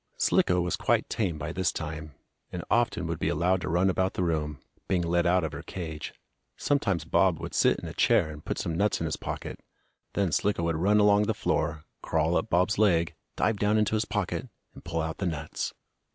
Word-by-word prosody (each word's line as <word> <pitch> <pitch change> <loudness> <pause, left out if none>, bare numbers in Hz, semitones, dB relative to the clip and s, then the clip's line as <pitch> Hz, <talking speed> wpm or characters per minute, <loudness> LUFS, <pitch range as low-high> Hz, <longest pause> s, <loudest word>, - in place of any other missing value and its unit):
Slicko 90 0 +3
was 90 -1 0
quite - - +1
tame 95 -8 -1
by 75 +1 -4
this 95 0 +1
time, 75 -2 -6 0.4
and 90 -1 -5
often 115 -5 +2
would 85 0 -3
be 80 - 0
allowed 90 +2 +1
to - - -3
run 90 +4 +3
about 95 0 +1
the 90 - 0
room, 75 -4 -1 0.3
being 90 -3 +1
let 85 +1 +2
out 90 0 +3
of 80 - -2
her - - -6
cage. 80 -4 -6 0.5
Sometimes 100 - 0
Bob 85 0 +3
would - - -6
sit - - +3
in - - -7
a - - -6
chair, 80 - +3
and 75 0 -10
put - - -3
some 80 - -2
nuts 105 +5 +1
in - - -2
his - - -1
pocket. - - -6 0.6
Then 100 -4 +1
Slicko 100 0 +1
would 85 -1 0
run 100 +5 +3
along 105 0 +5
on 105 - 0
the 110 - 0
floor, 75 -5 -1 0.2
crawl 80 +1 +1
up - - 0
Bob's 90 +4 +2
leg, 85 -6 +3 0.2
dive 110 0 +1
down 105 +1 +2
into 105 0 +1
his 110 0 +1
pocket, 105 +4 -2 0.2
and - - -13
pull 80 - -2
out 80 0 -4
the 95 - 0
nuts. 80 -4 -3
90 Hz, 220 wpm, -28 LUFS, 80-100 Hz, 0.6 s, along